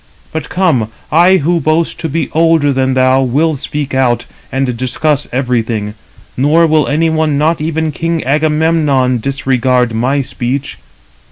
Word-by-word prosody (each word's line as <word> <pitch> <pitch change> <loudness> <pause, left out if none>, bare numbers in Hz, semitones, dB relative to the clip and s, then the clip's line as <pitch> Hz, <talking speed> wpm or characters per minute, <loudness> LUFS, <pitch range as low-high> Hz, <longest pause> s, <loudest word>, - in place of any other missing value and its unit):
But 160 -2 -5
come, 160 - +1 0.2
I 175 +4 +5
who 170 +2 +1
boast 160 +2 0
to 160 - -3
be 165 +4 -2
older 160 -3 +2
than 130 0 0
thou, 130 +1 +3
will 145 +5 +1
speak 145 +1 -5
out, 120 -2 +1 0.3
and 135 -2 -1
discuss 135 +4 -1
everything: 115 -5 -1 0.4
nor 150 +6 +3
will 155 -1 +2
any 160 +3 +1
one, 155 -2 0
not 155 +2 +1
even 160 0 -1
king 165 +2 -2
Agamemnon, 150 -3 +1
disregard 130 -2 0
my 130 +5 0
speech. 130 +2 -4
145 Hz, 145 wpm, -13 LUFS, 130-160 Hz, 0.4 s, I